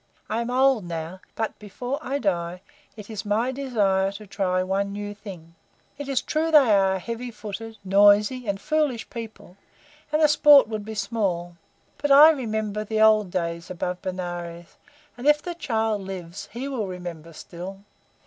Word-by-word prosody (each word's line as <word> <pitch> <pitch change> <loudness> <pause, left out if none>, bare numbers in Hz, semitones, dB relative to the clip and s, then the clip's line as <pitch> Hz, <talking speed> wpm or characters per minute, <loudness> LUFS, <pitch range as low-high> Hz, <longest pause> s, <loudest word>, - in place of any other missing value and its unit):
I 225 +2 0
am 235 - -3
old 260 -3 +3
now, 170 +2 -6
but 220 -1 -3
before 245 +7 -5
I 275 -1 -2
die 180 -6 -2 0.3
it 210 -2 -9
is 215 -3 -5
my 220 +5 0
desire 205 -8 +1
to 210 +1 -9
try 185 -2 0
one 195 +2 -1
new 205 0 -5
thing. 185 -6 -11 0.5
It 285 -1 -5
is 270 -2 0
true 320 +1 0
they 290 -7 +6
are 195 -1 +4
a - - -3
heavy 235 +5 -5
footed, 220 0 -8
noisy, 205 +5 +4
and 200 -1 -1
foolish 300 -4 0
people, 220 -5 -9 0.5
and 305 - +2
the 310 - +6
sport 295 -2 +7
would 215 -2 -4
be 220 0 -6
small, 195 -5 -2 0.4
but 290 - -1
I 295 +3 +9
remember 220 -6 -2
the 215 +1 -2
old 215 -2 +5
days 170 -1 -3
above 180 0 -4
Benares, 175 -2 -6 0.4
and, 245 +4 -4
if 295 0 +6
the 350 +3 -5
child 225 -9 -1
lives, 190 -1 -7
he 245 +5 -5
will 245 -7 -3
remember 175 -3 -7
still. 180 +4 -9
210 Hz, 170 wpm, -24 LUFS, 185-245 Hz, 0.5 s, I